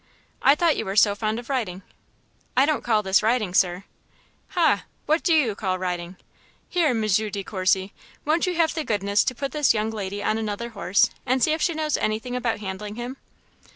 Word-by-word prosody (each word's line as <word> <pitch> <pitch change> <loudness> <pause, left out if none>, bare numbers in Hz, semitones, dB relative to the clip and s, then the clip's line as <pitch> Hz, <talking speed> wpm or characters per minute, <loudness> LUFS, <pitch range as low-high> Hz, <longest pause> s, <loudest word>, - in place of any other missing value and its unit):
"I 280 - +6
thought 330 0 +2
you - - -2
were 195 - -3
so 205 -1 +5
fond 215 +2 -2
of 240 - -7
riding." 210 -9 -3 0.7
"I 265 - +6
don't 305 -1 0
call 220 -3 +2
this 190 +1 +3
riding, 220 -4 +1
Sir." 180 0 +2 0.7
"Ha! 300 - +3 0.2
what 310 +2 +2
do 345 - +1
you 290 -9 +3
call 190 -2 -2
riding? 180 -1 -4 0.5
Here, 350 -3 +1
M. 240 -5 +1
De 205 -1 0
Courcy, 190 0 0 0.3
won't 320 +4 +2
you 360 - -1
have 330 -1 +2
the 320 - -2
goodness 205 -3 +1
to 255 - -2
put 275 +2 -4
this 295 -6 +2
young 215 +1 -1
lady 205 -1 -4
on 215 +2 0
another 220 +2 -3
horse, 200 -3 +2
and 255 -1 +1
see 310 - +3
if 315 - -2
she 335 +1 +1
knows 310 -1 0
anything 220 +4 -2
about 235 -4 -1
handling 205 +1 -5
him?" 245 +3 -6
220 Hz, 200 wpm, -24 LUFS, 200-275 Hz, 0.7 s, I